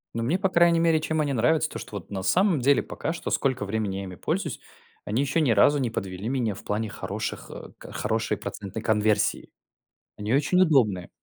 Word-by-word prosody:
Ну 115 Hz, -, -1 dB
мне, 140 Hz, +11 st, +1 dB
по 190 Hz, -, +1 dB
крайней 170 Hz, -1 st, +4 dB
мере, 165 Hz, -1 st, +3 dB
чем 160 Hz, 0 st, 0 dB
они 145 Hz, -2 st, 0 dB
нравятся, 145 Hz, +7 st, +2 dB
то -, -, -7 dB
что -, -, -9 dB
вот 95 Hz, -, -11 dB
на 95 Hz, -, -3 dB
самом 180 Hz, -, +3 dB
деле 140 Hz, +2 st, +4 dB
пока 160 Hz, -, -4 dB
что, 170 Hz, -, -5 dB
сколько 130 Hz, -6 st, 0 dB
времени 100 Hz, -2 st, -2 dB
я 100 Hz, -, -4 dB
ими 95 Hz, -, -7 dB
пользуюсь, -, -, -2 dB, 0.5 s
они 110 Hz, +5 st, 0 dB
еще 155 Hz, +4 st, +1 dB
ни 140 Hz, -, +2 dB
разу 140 Hz, +7 st, +5 dB
не 125 Hz, -, 0 dB
подвели 95 Hz, 0 st, -4 dB
меня 120 Hz, -6 st, 0 dB
в -, -, -11 dB
плане 110 Hz, +1 st, -2 dB
хороших, -, -, -5 dB
э, -, -, -9 dB
к -, -, -11 dB
хорошей -, -, -1 dB
процентной 100 Hz, +2 st, -6 dB
конверсии. 105 Hz, -1 st, +1 dB, 0.7 s
Они 105 Hz, +1 st, -3 dB
очень 150 Hz, +7 st, +3 dB
удобные. 110 Hz, -, +2 dB
120 Hz, 210 wpm, -26 LUFS, 105-155 Hz, 0.7 s, разу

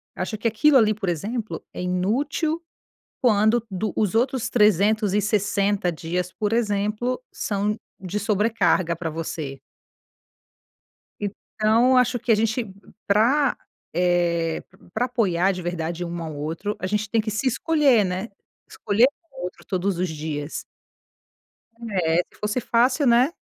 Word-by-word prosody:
Acho 200 Hz, +4 st, -3 dB
que 225 Hz, -, -1 dB
aquilo 265 Hz, +6 st, +4 dB
ali 215 Hz, -3 st, +4 dB
por 195 Hz, -3 st, -3 dB
exemplo 215 Hz, +7 st, -3 dB
é -, -, -5 dB
inútil 270 Hz, -, -1 dB, 0.6 s
quando 220 Hz, 0 st, +3 dB
do 200 Hz, +3 st, -2 dB
os 210 Hz, 0 st, 0 dB
outros 245 Hz, 0 st, +1 dB
360 205 Hz, -2 st, +2 dB
dias 175 Hz, +3 st, -3 dB
por 210 Hz, +3 st, -1 dB
exemplo 215 Hz, -, 0 dB
são 210 Hz, +1 st, -1 dB, 0.2 s
de 190 Hz, +2 st, -3 dB
sobrecarga 210 Hz, -4 st, +1 dB
pra 165 Hz, -1 st, -4 dB
você. 155 Hz, -3 st, -5 dB, 1.6 s
Então 220 Hz, +4 st, +1 dB
acho 250 Hz, 0 st, +3 dB
que 240 Hz, -, -4 dB
a -, -, +7 dB
gente, 220 Hz, 0 st, -1 dB, 0.3 s
pra, 245 Hz, +7 st, +3 dB, 0.4 s
eh, 170 Hz, -1 st, +1 dB, 0.3 s
pra 245 Hz, +3 st, +1 dB
apoiar 195 Hz, -6 st, +1 dB
de 180 Hz, -, -5 dB
verdade 175 Hz, 0 st, -3 dB
um 170 Hz, 0 st, -5 dB
ao 160 Hz, -2 st, -5 dB
outro, 165 Hz, +8 st, -4 dB
a 185 Hz, -, -3 dB
gente 210 Hz, +1 st, -1 dB
tem 225 Hz, -, +3 dB
que 215 Hz, -, -3 dB
se 215 Hz, +5 st, -2 dB
escolher, 275 Hz, -5 st, +3 dB
né, 185 Hz, +4 st, -3 dB, 0.4 s
escolher 225 Hz, +5 st, +3 dB, 0.2 s
o -, -, -9 dB
outro 180 Hz, -, -7 dB
todos 185 Hz, -1 st, -1 dB
os 185 Hz, -, 0 dB
dias. 150 Hz, -1 st, -4 dB, 1.3 s
É, 165 Hz, -4 st, +1 dB, 0.2 s
se -, -, -21 dB
fosse 210 Hz, +4 st, -1 dB
fácil, 255 Hz, +5 st, +2 dB
né? 245 Hz, +6 st, +4 dB
210 Hz, 135 wpm, -24 LUFS, 180-230 Hz, 1.6 s, a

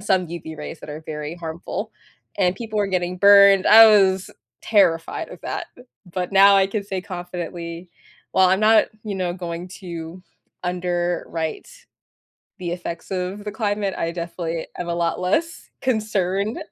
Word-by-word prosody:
some 190 Hz, -3 st, +1 dB
UV 160 Hz, -2 st, -8 dB
rays 150 Hz, +1 st, -7 dB
that -, -, -9 dB
are 155 Hz, +2 st, -7 dB
very 150 Hz, +1 st, -5 dB
harmful, 165 Hz, -1 st, -6 dB, 0.4 s
and 185 Hz, -1 st, +1 dB
people 220 Hz, -2 st, -4 dB
were 200 Hz, -1 st, +1 dB
getting 180 Hz, -1 st, -2 dB
burned, 200 Hz, -1 st, +7 dB
I 225 Hz, +1 st, +10 dB
was 190 Hz, -3 st, +4 dB, 0.3 s
terrified 180 Hz, -6 st, +2 dB
of -, -, -11 dB
that, -, -, -4 dB, 0.4 s
but 180 Hz, +1 st, -3 dB
now 195 Hz, 0 st, +7 dB
I 195 Hz, 0 st, +4 dB
can 205 Hz, +1 st, -3 dB
say 195 Hz, -2 st, -4 dB
confidently 175 Hz, -1 st, -6 dB, 0.4 s
well, 190 Hz, -1 st, +5 dB
I'm 190 Hz, -, +3 dB
not, 215 Hz, +1 st, +5 dB, 0.2 s
you 210 Hz, -2 st, -4 dB
know, 180 Hz, -2 st, -2 dB
going 175 Hz, 0 st, -6 dB
to 170 Hz, -1 st, -8 dB, 0.4 s
underwrite 175 Hz, -2 st, -2 dB, 0.9 s
the 175 Hz, -2 st, -4 dB
effects 175 Hz, -1 st, -6 dB
of 185 Hz, +2 st, -3 dB
the 210 Hz, -, -5 dB
climate, 205 Hz, -2 st, -1 dB
I 165 Hz, -, -2 dB
definitely 170 Hz, -1 st, -4 dB
am 175 Hz, -, -4 dB
a 170 Hz, -, -1 dB
lot 170 Hz, 0 st, -1 dB
less 320 Hz, -, -1 dB
concerned- 210 Hz, -4 st, -1 dB
180 Hz, 155 wpm, -22 LUFS, 170-200 Hz, 0.9 s, I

